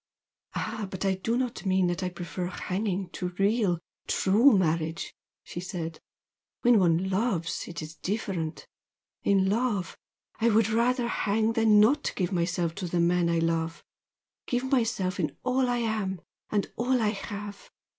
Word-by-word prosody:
"Ah, 215 -2 -3
but 190 0 -4
I 195 - +3
do 225 +5 -1
not 250 -2 -2
mean 190 -1 +2
that 175 0 -1
I 185 - -1
prefer 175 0 -5
hanging 185 0 -2
to 180 -1 -4
real, 200 -3 +2 0.3
true 215 +5 +5
marriage!" 165 -2 -1 0.3
she - - -7
said 170 -3 -5 0.6
"When 240 -2 +5
one 180 +1 +2
loves, 190 -5 -1
it 165 -2 -6
is 155 +1 -9
different! 180 -5 -3 0.6
In 195 -1 +3
love 210 -3 0 0.4
I 235 - +4
would 220 -1 +3
rather 235 +2 +2
hang 220 0 +1
than 220 -2 +5
not 280 +8 +3
give 180 -2 -1
myself 170 -2 0
to 180 - -2
the 175 +1 0
man 170 0 +3
I 170 - +2
love 165 0 -1 0.6
give 245 0 0
myself 200 -7 +1
in 155 - -2
all 255 0 +2
I 245 - +1
am, 215 -5 -1 0.3
and 205 -2 -1
all 250 +2 +2
I 215 -2 +2
have! 205 0 -6
195 Hz, 155 wpm, -28 LUFS, 175-225 Hz, 0.6 s, true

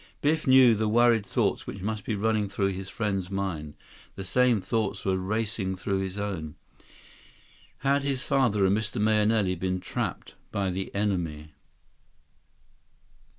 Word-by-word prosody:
Biff 155 +1 +1
knew 130 -2 +7
the 110 0 0
worried 115 0 +4
thoughts - - -1
which 95 - -6
must 105 -1 -3
be 110 - -1
running 105 0 0
through 100 -1 0
his 95 0 -6
friend's 95 -5 -2
mind. 90 -7 -3 0.4
The 95 - -6
same 120 +4 +3
thoughts 100 +1 -2
were 95 -1 +2
racing 100 -1 -2
through 95 +1 -2
his 95 0 -4
own. 95 -7 -4 1.3
Had 140 +1 +3
his 140 -1 -2
father 125 -9 +2
and 95 +1 +3
Mr. 110 +1 -2
Mahenili 105 -2 +2
been 95 +1 -2
trapped - - -4 0.2
by 100 -2 -1
the 95 +1 -4
enemy? 85 -7 -2
100 Hz, 145 wpm, -27 LUFS, 95-110 Hz, 1.3 s, knew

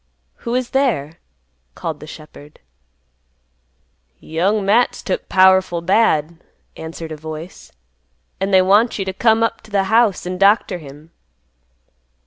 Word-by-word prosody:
"Who 235 +1 -4
is 255 -1 -2
there?" 225 - -1 0.6
called 160 -3 -5
the 150 - -11
shepherd. 150 -1 -13 1.6
"Young 195 +6 -1
Matt's 225 +5 +2
took 185 - -3
powerful 190 -2 +4
bad," 170 -4 +1 0.4
answered 160 0 -8
a 155 - -6
voice; 155 +3 -9 0.7
"an' 195 +1 -1
they 190 -1 +5
want 205 +5 +3
you 195 - -3
t' 190 - -4
come 225 +2 +2
up 230 0 -1
t' - - -18
th' - - -5
house, 220 -2 +2
an' 180 0 -5
doctor 200 -2 +3
him." 150 +2 -14
190 Hz, 130 wpm, -19 LUFS, 160-215 Hz, 1.6 s, they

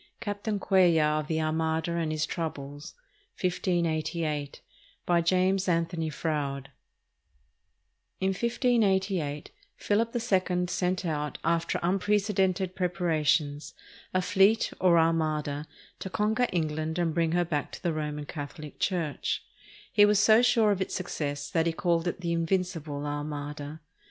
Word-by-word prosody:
CAPTAIN 205 0 -3
CUELLAR 165 -6 +3
OF 150 - -5
THE 160 0 0
ARMADA 160 +1 0
AND 165 -2 -1
HIS 155 0 0
TROUBLES 145 -4 -5 0.4
BY 170 -2 -2
JAMES 185 +2 +2
ANTHONY 165 -1 0
FROUDE 140 -2 -3 1.5
[In 190 - +1
1588, 195 - 0 0.3
Philip 225 +3 0
II 185 -6 +1
sent 180 +1 -1
out, 150 -3 -2
after 170 0 0
unprecedented 190 0 +1
prepara 175 -3 0
tions, 145 0 0 0.4
a 185 0 +1
fleet, 205 +3 +3
or 180 -2 +5
armada, 155 -2 +1 0.3
to 190 - -5
conquer 220 +5 +1
England 155 -1 -1
and 170 -2 0
bring 165 -1 +1
her 175 0 +2
back 150 -3 -2
to - - -9
the 170 -2 +1
Roman 150 -1 -3
Catholic 150 +1 -8
Church. 170 -6 -1 0.5
He 205 -2 +7
was 205 -1 +4
so 220 +2 +6
sure 225 -3 +4
of 195 -2 -1
its 190 - -2
success 145 -5 -3
that 165 -1 +2
he 165 - +1
called 170 0 0
it 175 - -3
the 170 -1 -2
"Invincible 165 -4 -1
Armada." 145 +1 -5
170 Hz, 130 wpm, -28 LUFS, 155-190 Hz, 1.5 s, He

